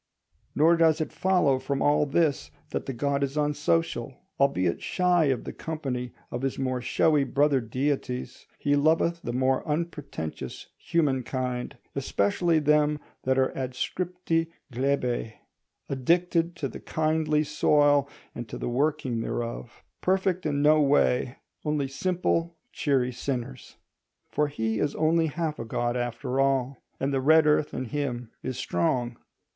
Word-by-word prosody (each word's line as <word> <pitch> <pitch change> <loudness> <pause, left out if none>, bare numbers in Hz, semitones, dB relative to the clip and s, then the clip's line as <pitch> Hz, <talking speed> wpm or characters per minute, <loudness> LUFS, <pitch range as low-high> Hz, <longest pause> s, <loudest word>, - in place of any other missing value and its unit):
Nor 165 +3 +5
does 160 -1 +4
it 155 - -2
follow 180 -8 +2
from 135 +1 -2
all 145 0 +3
this 145 -1 +1 0.2
that - - -3
the 135 - -2
god 140 +3 0
is 140 +2 -2
unsocial. 150 -3 0 0.2
Albeit 95 -11 +2
shy 180 -3 +2
of 130 -4 0
the - - -6
company 135 -6 -4 0.2
of 120 - -3
his 135 -1 -2
more 130 -2 -1
showy 145 +4 +3
brother 140 0 +2
deities, 125 +2 -3
he 145 0 +1
loveth 165 +3 +2
the 120 - -4
more 130 +1 +1
unpretentious 150 - -4
humankind, 130 -5 -1 0.2
especially 160 - +1
them 150 0 +3 0.3
that 130 0 +2
are 130 0 +3
adscripti 165 +6 -2 0.3
glebæ, 125 -3 0 0.5
addicted 170 +5 +1
to 150 -5 -2
the - - -9
kindly 155 -1 +1
soil 145 -1 +3 0.2
and 120 -2 -7
to - - -6
the - - -3
working 135 -2 0
thereof: 120 +1 -5 0.2
perfect 185 -2 +1
in 145 -1 0
no 155 +1 +6
way, 135 -3 +2 0.3
only 150 -2 0
simple, 170 +2 -1
cheery 130 -4 +1
sinners. 120 - -5 0.5
For 150 - +1
he 110 -6 -2
is 145 - 0
only 160 +1 +2
half 155 0 -3
a - - -3
god 120 +2 -1
after 125 +2 -2
all, 135 -1 +1 0.2
and 135 +1 -1
the 135 - +1
red 155 +3 +6
earth 150 0 +3
in 130 - -3
him 125 -3 -3
is 130 -1 -4
strong. 120 +3 -1
140 Hz, 140 wpm, -27 LUFS, 125-155 Hz, 0.5 s, no